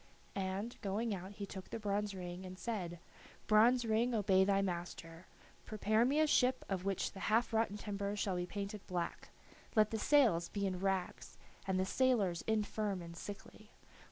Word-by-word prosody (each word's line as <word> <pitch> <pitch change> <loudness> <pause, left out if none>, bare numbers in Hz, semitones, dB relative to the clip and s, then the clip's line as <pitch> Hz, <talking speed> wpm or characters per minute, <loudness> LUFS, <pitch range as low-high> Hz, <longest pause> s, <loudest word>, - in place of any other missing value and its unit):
And, 195 +4 -3
going 210 +2 -1
out, 190 +1 -6
he 200 0 -5
took 190 -1 -9
the - - -4
bronze 205 -1 -1
ring 180 0 -6
and 185 0 -8
said: 185 -6 -3 0.5
"Bronze 235 +3 +5
ring, 230 +2 +2
obey 195 -3 +4
thy 195 0 +3
master. 175 -2 -4 0.4
Prepare 215 +1 +2
me 280 +4 +2
a 310 - +5
ship 260 -4 +3
of 190 -2 -2
which 195 -1 -1
the 195 - -10
half 225 +2 +2
rotten 220 -2 +1
timbers 200 0 -3
shall 195 -2 0
be 175 0 -2
painted 200 +1 -5
black, 175 -2 -3 0.5
let 215 -1 +4
the 220 - -1
sails 225 - +4
be 200 -1 -2
in 185 -2 -2
rags, 190 -1 -2 0.3
and 190 -1 +1
the 185 - +2
sailors 205 -7 +2
infirm 210 -2 0
and 170 0 -9
sickly. 205 +3 -9
200 Hz, 175 wpm, -36 LUFS, 185-220 Hz, 0.5 s, Bronze